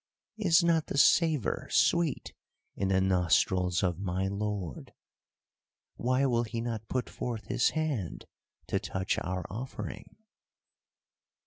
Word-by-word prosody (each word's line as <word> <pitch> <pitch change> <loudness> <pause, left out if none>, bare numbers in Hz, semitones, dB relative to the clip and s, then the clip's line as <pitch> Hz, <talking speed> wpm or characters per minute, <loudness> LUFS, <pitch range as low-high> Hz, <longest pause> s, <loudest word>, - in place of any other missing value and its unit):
Is 175 -4 +4
not 165 -2 +2
the - - -3
savour 155 - +3
sweet 170 -4 +2 0.4
in 95 - -1
the 95 0 +3
nostrils 90 0 +2
of 90 -2 0
my 95 0 -1
lord? 100 -7 -4 1.0
Why 130 +3 +1
will 120 -3 +2
he 115 0 -4
not 115 -2 -4
put 125 -2 -1
forth 115 -3 -5
his - - +2
hand 140 - -2 0.4
to - - -1
touch 95 0 -2
our 90 -1 -3
offering?" 125 +6 -7
110 Hz, 120 wpm, -30 LUFS, 95-135 Hz, 1.0 s, Is